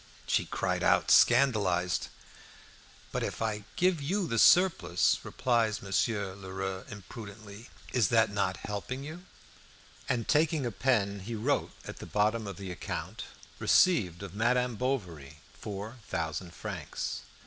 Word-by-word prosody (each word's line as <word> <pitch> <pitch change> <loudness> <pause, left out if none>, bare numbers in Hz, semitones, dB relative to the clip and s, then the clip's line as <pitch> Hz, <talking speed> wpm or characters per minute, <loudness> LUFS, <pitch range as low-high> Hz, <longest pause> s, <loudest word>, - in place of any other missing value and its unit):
She - - +1
cried - - -1
out, - - +3
scandalised. 100 -9 +4 1.0
"But - - -2
if - - -3
I 105 -2 -2
give 180 -3 +2
you 185 +7 0
the 115 -6 0
surplus," 175 - +4
replied 115 -4 0
Monsieur 100 0 0
Lheureux 95 -1 -5
impudently, 105 +1 -10 0.2
"is 120 -5 +3
that 110 -2 +3
not 95 -3 0
helping 115 +6 -4
you?" 165 +5 -8 0.8
And 120 -3 0
taking 155 -2 +2
a 120 - -1
pen 100 -2 +1
he 110 +5 -5
wrote 125 +7 0
at - - -7
the - - -9
bottom 105 +1 +1
of 100 -3 -6
the 95 -2 -6
account, 90 - -5 0.3
"Received 100 - +3
of 95 -2 -8
Madame 125 +3 +1
Bovary 90 - -3 0.2
four 105 +4 -7
thousand 85 +1 -3
francs." - - -5
105 Hz, 135 wpm, -30 LUFS, 95-125 Hz, 1.0 s, scandalised